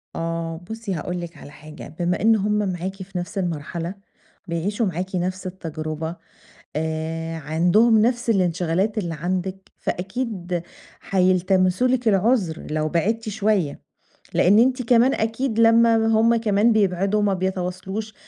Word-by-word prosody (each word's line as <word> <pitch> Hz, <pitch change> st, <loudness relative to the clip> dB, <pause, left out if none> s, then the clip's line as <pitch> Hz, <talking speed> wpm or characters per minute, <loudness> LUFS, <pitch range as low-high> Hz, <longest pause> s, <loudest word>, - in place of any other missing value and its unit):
آه، 165 Hz, 0 st, -3 dB
بُصي 220 Hz, -3 st, -4 dB
هاقول 175 Hz, +2 st, -3 dB
لكِ 170 Hz, -1 st, -8 dB
على -, -, -12 dB
حاجة 155 Hz, +1 st, -11 dB
بما 175 Hz, +1 st, 0 dB
إن 225 Hz, +1 st, +5 dB
هُم 210 Hz, 0 st, 0 dB, 0.2 s
معاكِ 185 Hz, +2 st, -4 dB
في 185 Hz, -1 st, -8 dB
نفس 175 Hz, +3 st, -5 dB
المرحلة 170 Hz, 0 st, -3 dB, 0.5 s
بيعيشوا 200 Hz, +7 st, -1 dB
معاكِ 185 Hz, +1 st, -3 dB
نفس 185 Hz, +1 st, -2 dB
التجربة 160 Hz, -2 st, -5 dB, 0.6 s
آآ 160 Hz, +1 st, -3 dB
عندهم 175 Hz, +10 st, +3 dB
نفس 240 Hz, +1 st, +1 dB
الانشغالات 185 Hz, +1 st, +1 dB
اللي 175 Hz, -5 st, -2 dB
عندِك، 185 Hz, +3 st, -3 dB
فأكيد 185 Hz, -3 st, -3 dB, 0.4 s
حيلتمسوا 185 Hz, +3 st, +2 dB
لكِ 250 Hz, -2 st, 0 dB
العذر 200 Hz, -4 st, +1 dB
لو 155 Hz, 0 st, 0 dB
بعدتِ 215 Hz, +7 st, 0 dB
شوية، 205 Hz, -7 st, 0 dB, 0.6 s
لأن 200 Hz, +4 st, +5 dB
أنتِ 255 Hz, +2 st, +3 dB
كمان 245 Hz, +2 st, +4 dB
أكيد 225 Hz, +1 st, -1 dB
لمّا 230 Hz, 0 st, +6 dB
هُم 225 Hz, +1 st, +4 dB
كمان 220 Hz, 0 st, +3 dB
بيبعدوا 195 Hz, 0 st, +2 dB
وما 205 Hz, -2 st, +2 dB
بيتواصلوش 190 Hz, +3 st, -3 dB
185 Hz, 130 wpm, -23 LUFS, 170-220 Hz, 0.6 s, لمّا